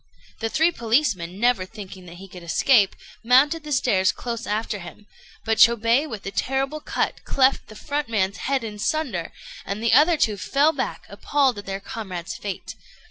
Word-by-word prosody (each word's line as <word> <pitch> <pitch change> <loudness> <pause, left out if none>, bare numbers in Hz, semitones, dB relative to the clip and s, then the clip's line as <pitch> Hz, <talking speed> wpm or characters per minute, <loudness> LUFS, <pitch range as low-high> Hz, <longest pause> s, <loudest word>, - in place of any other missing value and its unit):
The 225 - -2
three 320 +8 +3
policemen, 220 - 0
never 240 -4 +2
thinking 190 -2 -10
that 170 - -11
he 190 +2 -11
could 180 -1 -11
escape, 195 +5 +3 0.3
mounted 280 +7 +4
the 300 - -8
stairs 195 -9 +2
close 235 -1 -5
after 210 0 -2
him; 175 +4 -11 0.4
but 225 -1 0
Chôbei 235 +5 +4
with 215 -5 -7
a 195 - -4
terrible 270 +6 -1
cut - - -2
cleft 265 0 +2
the 215 - -12
front 290 +3 -3
man's 200 -3 0
head 270 -1 -1
in 210 -2 -7
sunder, 230 - -2 0.3
and 200 +2 -4
the 230 - +2
other 325 +2 +5
two 215 -7 +1
fell 280 - +2
back 270 -3 -4
appalled 270 -6 0
at 205 - -11
their 195 0 -3
comrade's 190 -5 -6
fate. 200 -3 -6
225 Hz, 180 wpm, -23 LUFS, 195-270 Hz, 0.4 s, other